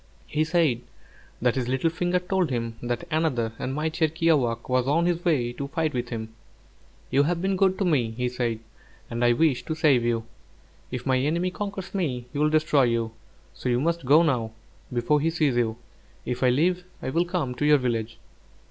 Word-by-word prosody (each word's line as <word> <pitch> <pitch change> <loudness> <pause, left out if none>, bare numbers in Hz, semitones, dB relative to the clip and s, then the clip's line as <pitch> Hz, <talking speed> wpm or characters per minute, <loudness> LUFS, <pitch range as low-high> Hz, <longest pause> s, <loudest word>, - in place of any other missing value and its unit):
He 155 +1 0
said 155 -7 +2 0.6
that 125 -2 +3
his 130 -2 -2
little 130 +6 +1
finger 175 +2 0
told 180 -2 0
him 115 -2 -2
that 120 +5 -2
another 135 -8 0
and 130 - -3
mightier 160 +1 +1
kiawākq' 150 -8 +1
was 130 0 +1
on 165 +5 +2
his 175 -1 0
way 125 -8 +1
to 140 +3 -5
fight 155 +1 -1
with 120 -1 -3
him. 110 -2 -5 0.8
"You 135 +2 +4
have 170 +4 +1
been 190 +2 0
good 190 0 +2
to 195 - 0
me," 140 -10 +2
he 125 0 0
said, 120 -2 -2 0.5
"and 120 +1 -1
I 120 0 +5
wish 145 -1 +2
to 160 - -2
save 150 -7 +3
you. 115 -1 0 0.7
If 125 -1 -5
my 130 -2 +2
enemy 170 +7 0
conquers 195 -1 -5
me, 135 -11 -2
he 145 - -3
will 150 0 +3
destroy 155 -3 +3
you; 115 -1 0 0.4
so 125 - -4
you 120 0 +2
must 170 +4 0
go 145 +6 +6
now, 120 -8 0 0.4
before 125 +5 +1
he 160 - +2
sees 155 -6 +1
you. 115 -2 0 0.5
If 125 0 -3
I 130 - +4
live, 175 +8 +2 0.2
I 130 - -2
will 170 +5 +2
come 175 -8 -2
to 125 - -4
your 150 0 +7
village." 115 -3 -2
140 Hz, 200 wpm, -25 LUFS, 120-165 Hz, 0.8 s, your